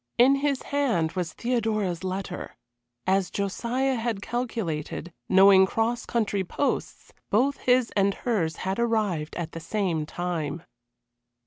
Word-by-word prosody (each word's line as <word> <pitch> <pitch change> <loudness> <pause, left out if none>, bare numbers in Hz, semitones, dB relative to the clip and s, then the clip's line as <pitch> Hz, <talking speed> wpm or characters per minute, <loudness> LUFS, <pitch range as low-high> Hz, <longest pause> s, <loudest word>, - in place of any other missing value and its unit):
In 265 +3 +6
his 280 -1 0
hand 235 - +1
was 175 -2 -3
Theodora's 215 -7 -1
letter. 185 0 -4 0.5
As 190 0 +2
Josiah 240 +7 -1
had 225 -3 -1
calculated, 195 -9 -3 0.2
knowing 190 0 +7
cross 225 +3 -1
country 205 -4 0
posts, 280 +10 -3 0.2
both 265 +7 +2
his 250 -1 +2
and 200 0 +2
hers 180 -10 -1
had 190 +3 -1
arrived 210 -10 0
at 170 -2 -4
the 165 - -6
same 165 -3 -1
time. 170 -2 -3
200 Hz, 125 wpm, -26 LUFS, 175-235 Hz, 0.5 s, knowing